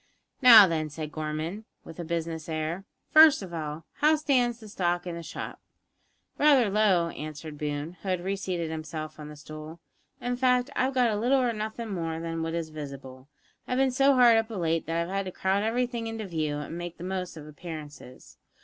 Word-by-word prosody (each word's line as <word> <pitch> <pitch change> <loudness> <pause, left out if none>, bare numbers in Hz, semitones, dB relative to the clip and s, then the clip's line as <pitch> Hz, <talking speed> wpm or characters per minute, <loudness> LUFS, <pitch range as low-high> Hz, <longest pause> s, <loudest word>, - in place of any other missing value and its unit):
"Now, 230 -5 +11
then," 160 -3 -1
said 150 0 -6
Gorman, 155 +7 -4 0.2
with 165 - -11
a - - -3
business 165 -1 -4
air, 160 +4 -3 0.3
"first 310 -7 +8
of 180 -2 -9
all, 155 -1 -5
how 305 +1 +4
stands 250 -6 +1
the 220 - -11
stock 175 -3 -1
in 175 - -4
the 170 - -6
shop?" 165 - -7 0.8
"Rather 275 -8 +5
low," 195 -5 +3
answered 155 -1 -8
Boone, 150 +3 -4
who 190 - -5
had 180 -1 -1
reseated 185 -4 -2
himself 155 0 -6
on 150 0 -8
the 150 - -10
stool; 155 +2 -10 0.4
"in 245 0 -2
fact, 250 +1 +2
I've 260 +1 0
got 240 -4 +3
little 255 +4 +3
or 245 -2 +1
nothing 220 0 -4
more 165 -3 -3
than 165 0 -4
what 165 0 -2
is 165 -2 -3
visible. 140 -3 -9 0.4
I've 250 - -1
bin 265 0 +3
so 275 +2 +4
hard 240 -3 +7
up 225 0 0
of 205 -5 -4
late 165 0 0
that 165 +1 0
I've 180 +3 -6
had 195 0 -1
to 185 - -5
crowd 190 +2 0
everything 235 +1 -1
into 225 -1 -5
view 155 -5 -2
an' 150 +2 -5
make 175 -1 -6
the - - -9
most 185 -2 -4
of 150 - -9
appearances. 150 -4 -10
175 Hz, 200 wpm, -27 LUFS, 155-225 Hz, 0.8 s, Now